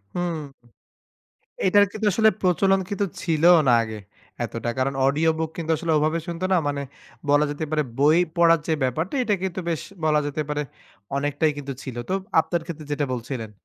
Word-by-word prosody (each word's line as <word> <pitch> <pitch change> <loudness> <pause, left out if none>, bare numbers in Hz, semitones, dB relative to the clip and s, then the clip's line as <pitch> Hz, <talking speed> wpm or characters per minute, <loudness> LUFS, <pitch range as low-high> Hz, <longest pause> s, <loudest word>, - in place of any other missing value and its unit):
হুম। 175 -2 -1 1.3
এইটার 205 +2 +6
কিন্তু 215 0 -3
আসলে 220 +3 +5
প্রচলন 190 +2 +3
কিন্তু 200 0 0 0.2
ছিলও 170 +1 +5
না - - +6
আগে 110 -1 -6 0.5
এতটা। 115 0 -4
কারণ 135 +1 0
অডিও 155 +4 +3
বুক 160 -1 -2
কিন্তু 165 -1 -3
আসলে 165 +1 -1
ওভাবে 155 +2 +1
শুনতো 170 +1 -4
না। 185 - +5
মানে 145 -1 -2 0.5
বলা 145 +1 +5
যেতে 145 +2 -3
পারে 155 -1 +1 0.2
বই 150 +4 +5 0.2
পড়ার 165 -1 +5
যে - - +2
ব্যাপারটা 160 - -2
এটা 210 -3 +2
কিন্তু 190 0 -3
বেশ 165 -1 -2 0.2
বলা 150 -1 +3
যেতে 150 +1 -2
পারে 150 0 -1 0.5
অনেকটাই 145 +2 +1
কিন্তু 140 -1 -5
ছিল। 130 -3 -6
তো 185 - 0 0.3
আপনার 170 +1 -2
ক্ষেত্রে 160 -3 -7
যেটা 145 -1 0
বলছিলেন। 120 -2 -5
155 Hz, 175 wpm, -24 LUFS, 145-175 Hz, 1.3 s, এইটার